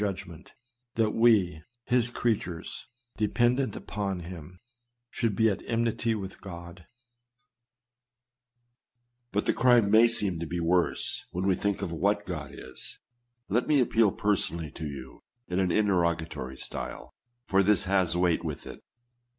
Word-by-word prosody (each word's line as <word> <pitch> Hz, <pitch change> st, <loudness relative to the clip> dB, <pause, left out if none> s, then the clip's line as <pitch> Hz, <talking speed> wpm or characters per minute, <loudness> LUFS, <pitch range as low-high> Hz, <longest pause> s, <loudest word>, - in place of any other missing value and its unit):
judgment 95 Hz, -5 st, -5 dB, 0.2 s
— 120 Hz, 0 st, -55 dB
that 110 Hz, -2 st, +2 dB
we, 100 Hz, -8 st, +3 dB, 0.2 s
his 120 Hz, -1 st, +2 dB
creatures, 105 Hz, -9 st, -2 dB, 0.3 s
dependent 120 Hz, +5 st, +1 dB
upon 100 Hz, -4 st, -3 dB
him, 90 Hz, 0 st, -9 dB, 0.5 s
should 115 Hz, -5 st, 0 dB
be 110 Hz, +3 st, +4 dB
at 100 Hz, -, 0 dB
enmity 115 Hz, 0 st, 0 dB
with 95 Hz, -2 st, -7 dB
God? 85 Hz, -1 st, -10 dB, 2.4 s
•But 105 Hz, -, 0 dB
the -, -, +3 dB
crime 120 Hz, -5 st, +4 dB
may 110 Hz, +2 st, +7 dB
seem 100 Hz, -7 st, 0 dB
to 85 Hz, -, -4 dB
be 85 Hz, +2 st, -3 dB
worse 85 Hz, +1 st, 0 dB
when 90 Hz, +2 st, -3 dB
we 95 Hz, -, +4 dB
think 100 Hz, 0 st, -1 dB
of -, -, -3 dB
what 100 Hz, +5 st, +1 dB
God 80 Hz, -6 st, -5 dB
is. 65 Hz, -2 st, -9 dB, 0.5 s
Let 115 Hz, +6 st, +1 dB
me 150 Hz, -2 st, +4 dB
appeal 115 Hz, -4 st, +3 dB
personally 85 Hz, -7 st, -1 dB
to 80 Hz, -1 st, -6 dB
you 65 Hz, -2 st, -8 dB, 0.3 s
in 90 Hz, +1 st, -1 dB
an 95 Hz, -1 st, +2 dB
interrogatory 85 Hz, -9 st, 0 dB
style, -, -, -7 dB, 0.3 s
for 95 Hz, -3 st, +3 dB
this 100 Hz, -1 st, +3 dB
has 95 Hz, -3 st, +1 dB
weight 90 Hz, -2 st, +2 dB
with 75 Hz, -3 st, -4 dB
it. -, -, -9 dB
95 Hz, 140 wpm, -28 LUFS, 85-110 Hz, 2.4 s, may